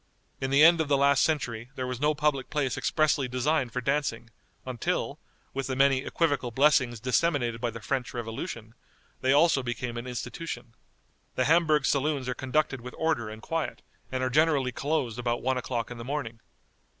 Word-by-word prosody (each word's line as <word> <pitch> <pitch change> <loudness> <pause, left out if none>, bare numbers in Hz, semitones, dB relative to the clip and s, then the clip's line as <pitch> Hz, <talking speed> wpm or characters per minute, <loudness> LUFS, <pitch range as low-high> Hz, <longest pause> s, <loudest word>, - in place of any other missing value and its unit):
In 135 - -2
the 140 +2 +5
end 170 0 +7
of 160 - -1
the 140 -1 +3
last 140 -1 +4
century 125 -7 -1
there 130 - -3
was 125 0 -4
no 150 +1 +2
public 145 -3 0
place 140 -5 0
expressly 150 -3 +1
designed 130 +1 0
for 125 - -2
dancing, 125 -4 -1 0.3
until, 125 -3 -2 0.3
with 135 -1 -3
the 130 - -2
many 135 0 +4
equivocal 145 -2 0
blessings 130 -2 +3
disseminated 120 -1 +1
by 120 - 0
the 115 0 -8
French 130 +3 -2
Revolution, 115 -1 -6 0.5
they 130 - +2
also 145 0 +4
became 120 -1 -4
an 120 +2 -5
institution. 125 0 -6 0.6
The 130 - +1
Hamburg 155 -1 +4
saloons 140 -2 +1
are 125 - 0
conducted 135 0 -1
with 125 +1 -9
order 155 -9 0
and 110 0 -10
quiet, 165 -1 -3 0.3
and 130 0 -1
are 130 - 0
generally 145 -3 +3
closed 135 -4 -1
about 120 -1 -1
one 130 0 +1
o'clock 120 -1 -3
in 120 - -7
the - - -6
morning. 125 -4 -4
130 Hz, 180 wpm, -28 LUFS, 120-150 Hz, 0.6 s, end